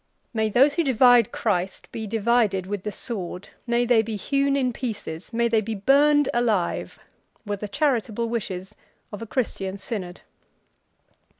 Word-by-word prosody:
"May 220 -1 +1
those 270 +7 +4
who 335 - +1
divide 245 -4 +5
Christ 180 +2 -2
be 220 -1 -5
divided 220 -3 +1
with 200 0 -4
the 210 - -4
sword, 190 -4 -6 0.2
may 240 0 +2
they 240 -2 +4
be 220 0 -4
hewn 275 +6 +1
in 255 -3 0
pieces, 205 -10 -6
may 235 0 +1
they 225 -1 +2
be 220 +1 -4
burned 285 +6 +4
alive!" 220 -7 0 0.5
were 205 -1 -2
the 210 - -5
charitable 235 -2 0
wishes 195 -4 -4 0.4
of 205 - -7
a 230 - -6
Christian 200 -6 -2
synod. 190 -3 -6
225 Hz, 155 wpm, -24 LUFS, 200-245 Hz, 0.5 s, divide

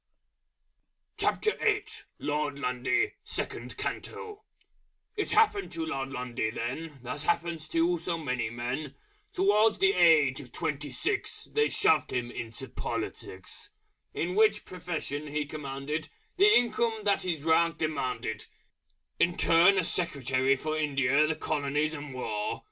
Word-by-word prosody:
LORD 145 -1 -1
LUNDY 135 - 0
(SECOND - - -4
CANTO) 425 -1 -5 0.7
It 415 - -1
happened 425 -2 +3
to 165 -1 -2
Lord 135 -3 -3
Lundy 125 -4 -2
then, 135 +6 -5
As 125 +4 -3
happens 165 0 -1
to 170 +2 +2
so 170 0 -2
many 125 -7 -2
men: 125 +5 -4 0.4
Towards 210 +3 +3
the 195 0 +4
age 155 -7 +5
of 125 - -13
twenty 150 -3 -3
six, 415 +3 -2
They 445 0 +1
shoved 425 +1 +2
him 120 -1 -2
into 120 +4 -5
politics; 95 -5 -5 0.5
In 175 +2 -1
which 215 +1 +3
profession 165 -5 -4
he 150 0 -2
commanded 145 +1 -4 0.3
The 405 +3 +7
income 235 - +2
that 200 -1 +2
his 165 -5 -2
rank 165 +1 +3
demanded 155 -5 -2 0.7
In 175 0 +2
turn 175 +4 +6
as 185 - +1
Secretary 135 -5 +1
for 155 +3 -3
India, 145 -1 +2
the 160 - 0
Colonies, 150 0 0
and 145 -3 -7
War. 105 -4 -2
155 Hz, 125 wpm, -29 LUFS, 135-180 Hz, 0.7 s, The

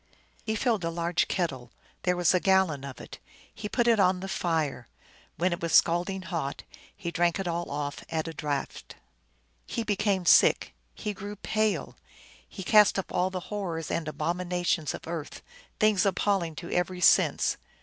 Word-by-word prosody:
He 220 - 0
filled 220 -4 0
a 165 - 0
large 170 +1 0
kettle; 130 -10 -2 0.3
there 180 -1 +1
was 175 -1 +3
a 185 - +3
gal 190 +1 +4
lon 140 -3 -6
of 140 -2 -8
it. - - -10 0.3
He 210 0 -6
put 240 +1 +1
it 230 -2 +4
on 185 -1 +3
the 190 - -5
fire. 160 -9 -1 0.5
When 180 +2 +1
it 170 - -5
was 170 -1 -2
scald 175 +2 +4
ing 190 -1 -4
hot 165 -6 -4 0.3
he 175 -4 -4
drank 175 +2 +1
it 190 - -3
all 170 0 -2
off 145 0 -4
at 160 0 -2
a 165 - -5
draught. 145 -2 -4 0.8
Pie 230 - -1
became 200 -3 0
sick; - - +5 0.2
he 210 - -4
grew 205 +1 -7
pale. 215 +1 -1 0.5
He 190 - -8
cast 210 +2 +5
up 195 - -3
all 180 +1 +1
the 185 -1 -5
horrors 170 -6 -3
and 165 -2 -2
abominations 175 0 -1
of - - -10
earth, 165 -3 -6 0.4
things 215 -3 +4
appalling 195 -4 0
to 170 +3 -7
every 180 +1 -1
sense. - - +4
180 Hz, 180 wpm, -28 LUFS, 165-195 Hz, 0.8 s, sick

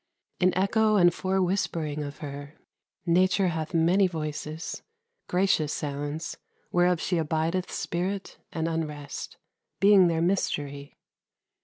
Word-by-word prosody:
In 185 0 +4
echo 215 +3 +3
and 175 -3 +6
forewhispering 180 -5 -1
of 145 0 -7
her, 145 +1 -8 0.5
Nature 185 +2 +3
hath 160 -1 -3
many 175 +4 +4
voices 155 -1 -5 0.5
gracious 180 -5 +2
sounds 145 +2 -4 0.3
Whereof 175 -1 +3
she 175 0 0
abideth 160 +3 -1
spirit 185 +3 -3
and 165 -1 -2
unrest, 150 -3 -4 0.4
Being 195 -2 +7
their 165 -1 +1
mystery. 145 -6 -2
165 Hz, 110 wpm, -27 LUFS, 150-185 Hz, 0.5 s, Being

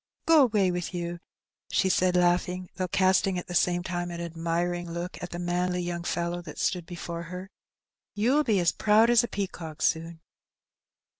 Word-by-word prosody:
"Go 325 -2 +6
away 210 -7 +3
with 175 +1 -4
you," 175 0 -4 0.5
she 190 - +2
said, 185 -1 +2
laughing, 180 +1 +1
though 185 -1 -2
casting 190 +1 +2
at 175 - -4
the 175 - -7
same 175 0 +2
time 175 -1 -3
an 170 -1 -6
admiring 170 +1 -2
look 170 +2 -5
at 180 - -5
the 175 - -6
manly 180 +1 -1
young 175 0 -3
fellow 175 0 -2
that 160 -4 -10
stood 175 -3 -1
before 170 -1 -6
her, 180 +3 -8 0.6
"you'll 250 +9 +3
be 215 -8 +2
as 175 -1 +3
proud 220 +2 +4
as 240 0 +5
a - - -1
pea 200 -3 -2
cock 160 -4 -9
soon." 165 0 0
175 Hz, 180 wpm, -27 LUFS, 170-190 Hz, 0.6 s, Go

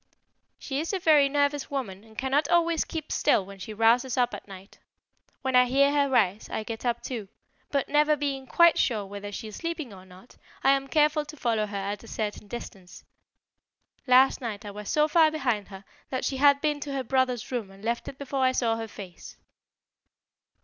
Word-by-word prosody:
"She 275 0 -4
is 330 +6 -3
a - - +1
very 300 -5 +5
nervous 285 0 0
woman 215 -9 -4
and 220 -1 -19
cannot 270 +3 +1
always 335 -2 +2
keep 315 -2 -6
still 205 -10 +2
when 195 0 -12
she 205 - -7
rouses 230 +4 +2
up 245 -1 +2
at - - -8
night. 195 0 -13 0.6
When 260 -1 0
I 250 0 +7
hear 275 +3 +3
her 285 -1 +2
rise, 215 -6 +1
I 220 - -3
get 225 +2 -7
up 235 0 -1
too; 230 -6 -5 0.4
but, 280 -2 0
never 300 +1 +3
being 275 -2 -3
quite 340 +4 +5
sure 215 -5 +1
whether 205 +1 -7
she 220 - -6
is 210 - -9
sleeping 330 -8 -4
or 185 -1 -12
not, 185 +6 -17 0.3
I 270 - +6
am 275 0 +1
careful 300 +1 +2
to 305 +1 -11
follow 225 -4 0
her 205 -1 -5
at 200 +2 -4
a - - -13
certain 210 -1 -4
distance. 195 -5 -9 1.0
Last 255 +2 +5
night 215 -4 -5
I 205 - -6
was 210 0 -8
so 300 0 +3
far 320 0 +5
behind 250 -10 -1
her 195 0 -11 0.2
that 260 - -2
she 270 - -1
had 280 +1 +5
been 300 -1 0
to 285 -1 -5
her 270 -1 -2
brother's 255 -1 0
room 235 -6 -3
and 195 +2 -14
left 235 +1 -2
it 270 - -8
before 275 -1 -3
I 255 0 +3
saw 230 -3 +1
her 225 0 -5
face." 190 -4 -11
255 Hz, 205 wpm, -27 LUFS, 210-285 Hz, 1.0 s, I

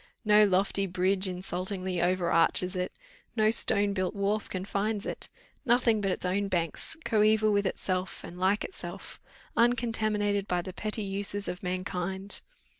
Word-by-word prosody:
No 210 0 +6
lofty 195 0 +1
bridge 185 +2 +1
insultingly 185 0 -3
over 175 0 +1
arches 180 +3 +3
it, 180 0 -2 0.4
no 215 -1 +4
stone 205 -3 +3
built 185 -1 -1
wharf 200 +2 -1
confines 200 +2 -2
it; - - -3 0.3
nothing 235 -3 +3
but 195 - 0
its 185 - -2
own 200 +2 0
banks, 175 - -1
coeval 215 0 +3
with 200 -1 +2
itself 185 0 -3
and 175 - -9
like 190 +3 +2
itself, - - -7 0.4
uncontaminated 215 -4 +1
by 180 -1 0
the 185 - -7
petty 215 +2 -3
uses 200 +1 -4
of 180 - -4
mankind! 185 +1 -3
195 Hz, 145 wpm, -29 LUFS, 185-210 Hz, 0.4 s, No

